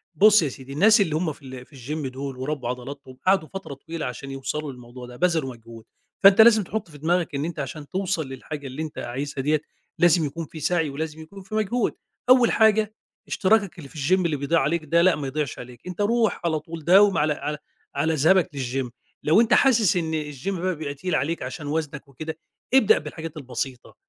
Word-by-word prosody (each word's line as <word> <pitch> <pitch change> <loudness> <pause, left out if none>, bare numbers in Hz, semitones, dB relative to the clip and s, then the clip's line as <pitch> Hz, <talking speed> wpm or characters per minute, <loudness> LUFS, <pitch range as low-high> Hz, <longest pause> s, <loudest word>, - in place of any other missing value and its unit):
بُصّ 210 +5 +6
يا 145 - 0
سيدي، 130 +1 -10
الناس 205 +8 +5
اللي 160 -6 +1
هم 160 -1 -1
في - - -21
ال 130 -1 -9
في 145 - -19
الgym 140 +3 -4
دُول 135 0 -6
وربّوا 130 -2 -3
عضلاتهم، 130 +1 -7
قعدوا 190 -4 +3
فترة 195 -6 -7
طويلة 160 +3 -6
عشان 130 +2 -6
يوصلوا 140 +2 -4
للموضوع 125 0 -11
ده، 125 - -11
بذلوا 160 -3 +1
مجهود 115 -1 -13 0.4
فأنت 195 +2 +9
لازم 220 -2 +7
تحُطّ 200 0 -4
في 150 - -12
دماغك 165 +1 0
إن 140 +2 -1
أنت 165 -2 -5
عشان 145 +1 -6
توصل 185 -5 -1
للحاجة 140 +2 -7
اللي 135 +4 -6
أنت 155 -2 -6
عايزها 135 +3 -4
دِيَّة، 150 +2 +1 0.4
لازم 170 -2 +4
يكون 165 +3 -5
في 155 - -10
سَعي 165 0 +1
ولازم 155 +2 -5
يكون 195 +5 -11
في 215 +3 -7
مجهود، 220 +2 0 0.4
أول 255 -2 +6
حاجة 220 -1 +3 0.3
إشتراكك 200 -2 +2
اللي 145 -5 -10
في - - -19 0.2
الgym - - 0
اللي 160 -3 +1
بيضيع 150 +4 +1
عليك 155 +3 0
ده، 170 +3 +3
لأ، 185 +1 +5
ما 145 -2 -4
يضيعش 145 -1 -3
عليك 125 +5 -11
أنت 180 +2 -4
رُوح 225 +1 +1
على 160 -2 +1
طول 165 0 -9
داوم 195 +1 +6
على 150 0 +2
على 150 +1 -4 0.4
على 155 +3 +1
ذهابك 165 +5 +4
للgym 130 -1 -2 0.3
لو 160 +9 +5
أنت 235 0 +3
حاسس 225 -8 +4
إن 160 -3 -2
الgym 140 +8 -5
بقى 185 +1 -1
بيبقى 150 -2 -5
تقيل 180 +4 -2
عليك 165 +4 -1
عشان 150 -3 -6
وَزنك 150 -1 -3
وكده، 155 +4 -7 0.4
ابدأ 265 -6 +6
بالحاجات 160 -1 -7
البسيطة، 130 -2 -5
155 Hz, 205 wpm, -24 LUFS, 140-180 Hz, 0.4 s, فأنت